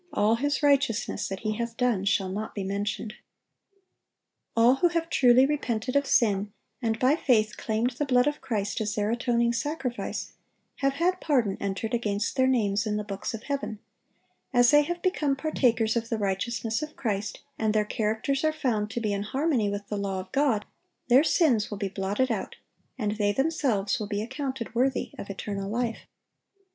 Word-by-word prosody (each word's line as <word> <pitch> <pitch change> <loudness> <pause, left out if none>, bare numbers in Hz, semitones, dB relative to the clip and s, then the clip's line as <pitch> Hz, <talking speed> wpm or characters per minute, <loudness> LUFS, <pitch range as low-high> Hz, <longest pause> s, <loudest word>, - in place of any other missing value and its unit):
all 210 +2 +3
his 285 +4 -1
righteousness 275 -6 +2
that 195 0 -5
he 215 - -1
hath 235 -1 -4
done 240 -6 +1
shall 195 -1 +1
not 210 +3 -5
be 200 - -3
mentioned."(856) 205 +3 -3 1.4
All 235 +3 +6
who 350 - +4
have 335 -1 -2
truly 250 0 +6
repented 255 -4 -2
of 280 -1 +3
sin, 205 -3 +2 0.3
and 225 -2 0
by 260 +5 +3
faith 220 -8 +2
claimed 225 +3 -1
the 275 +4 -2
blood 250 -2 +3
of 295 0 -1
Christ 210 -3 -2
as 210 -2 -2
their 210 +1 0
atoning 235 0 +1
sacrifice, 270 -1 -3 0.4
have 275 -1 +1
had 355 +5 0
pardon 245 -10 +1
entered 200 +4 -3
against 210 -3 -1
their 260 -1 +3
names 215 -4 +1
in 210 0 0
the 210 - -2
books 200 +1 -4
of 225 - -9
heaven; 280 -6 -3 0.7
as 245 -2 +5
they 295 0 +7
have 345 +4 -4
become 305 -7 +1
partakers 240 -6 +1
of 230 0 -1
the 225 - 0
righteousness 220 +3 -1
of 305 0 -6
Christ, 210 -3 -3 0.2
and 220 -1 +2
their 210 0 +2
characters 220 +6 -1
are 310 - +3
found 235 -9 -1
to 230 - -3
be 210 -2 0
in 200 - -1
harmony 260 0 0
with 205 0 -4
the 210 - -2
law 195 -1 -2
of 185 0 -9
God, 270 -7 +1 0.4
their 255 +4 +7
sins 275 - +3
will 205 - -5
be 200 -1 -2
blotted 200 +6 -1
out, 210 -4 -3 0.4
and 210 -3 -2
they 205 -1 +2
themselves 250 -6 0
will 210 - -3
be 205 0 -2
accounted 260 -1 -4
worthy 250 0 0
of 200 - -7
eternal 195 0 -4
life. 230 +1 -2
230 Hz, 185 wpm, -27 LUFS, 210-270 Hz, 1.4 s, they